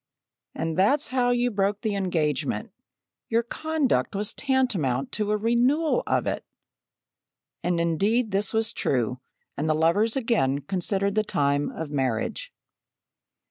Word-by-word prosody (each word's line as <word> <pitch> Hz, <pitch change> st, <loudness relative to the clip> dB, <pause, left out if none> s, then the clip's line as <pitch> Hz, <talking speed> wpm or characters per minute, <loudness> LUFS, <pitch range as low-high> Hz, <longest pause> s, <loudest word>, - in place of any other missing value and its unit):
"And 165 Hz, -1 st, -2 dB
that's 275 Hz, +10 st, +3 dB
how 250 Hz, -1 st, +1 dB
you 245 Hz, 0 st, +2 dB
broke 200 Hz, 0 st, 0 dB
the 215 Hz, -, -1 dB
engagement. 165 Hz, -7 st, -1 dB, 0.6 s
Your 230 Hz, +1 st, +2 dB
conduct 310 Hz, -3 st, -1 dB
was 205 Hz, +1 st, -1 dB
tantamount 195 Hz, -, 0 dB
to 210 Hz, -1 st, -1 dB
a 210 Hz, -, +2 dB
renewal 250 Hz, -, +2 dB
of -, -, +1 dB
it!" -, -, -2 dB, 1.2 s
And 175 Hz, -1 st, 0 dB
indeed 205 Hz, +8 st, +1 dB
this 200 Hz, +2 st, +1 dB
was 220 Hz, 0 st, 0 dB
true, 125 Hz, -1 st, 0 dB, 0.4 s
and 150 Hz, +3 st, -2 dB
the 155 Hz, -, +3 dB
lovers 170 Hz, +8 st, +2 dB
again 215 Hz, -, +1 dB
considered 195 Hz, +5 st, 0 dB
the 215 Hz, +1 st, +2 dB
time 145 Hz, -7 st, 0 dB
of 155 Hz, -2 st, -6 dB
marriage. 135 Hz, -, -1 dB
205 Hz, 135 wpm, -25 LUFS, 155-240 Hz, 1.2 s, that's